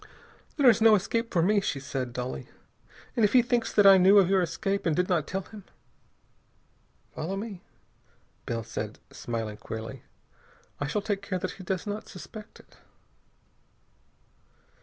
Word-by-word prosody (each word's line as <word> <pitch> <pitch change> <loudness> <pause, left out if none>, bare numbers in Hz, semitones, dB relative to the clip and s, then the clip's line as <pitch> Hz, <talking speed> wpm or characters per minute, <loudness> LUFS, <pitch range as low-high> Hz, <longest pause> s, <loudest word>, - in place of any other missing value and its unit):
"There 280 -3 +4
is 230 -2 +6
no 220 -1 +7
escape 230 +4 -1
for 170 - +2
me," 205 +3 +3
she 145 - -2
said 135 -2 -4
dully, 125 - -5 0.7
"and 230 - +2
if 210 - +3
he 250 -2 +6
thinks 240 -1 0
that 205 - +4
I 195 -1 +9
knew 190 +3 +6
of 190 -2 +5
your 190 -1 +4
escape 180 +3 -2
and 160 - +2
did 180 +2 +1
not 165 -5 0
tell 195 0 -3
him...." 205 +1 -12 1.5
"Follow 175 +5 -4
me," 200 -3 -6 1.0
said 110 -1 -5
Bell, - - -22
smiling 115 -3 -4
queerly. 110 +4 -7 0.8
"I 145 - -2
shall 200 +7 -2
take 205 -2 -2
care 200 -2 -3
that 185 0 -3
he 190 - -11
does 185 0 -3
not 205 +1 -5
suspect 205 +4 -11
it." - - -20
190 Hz, 160 wpm, -27 LUFS, 145-210 Hz, 1.5 s, I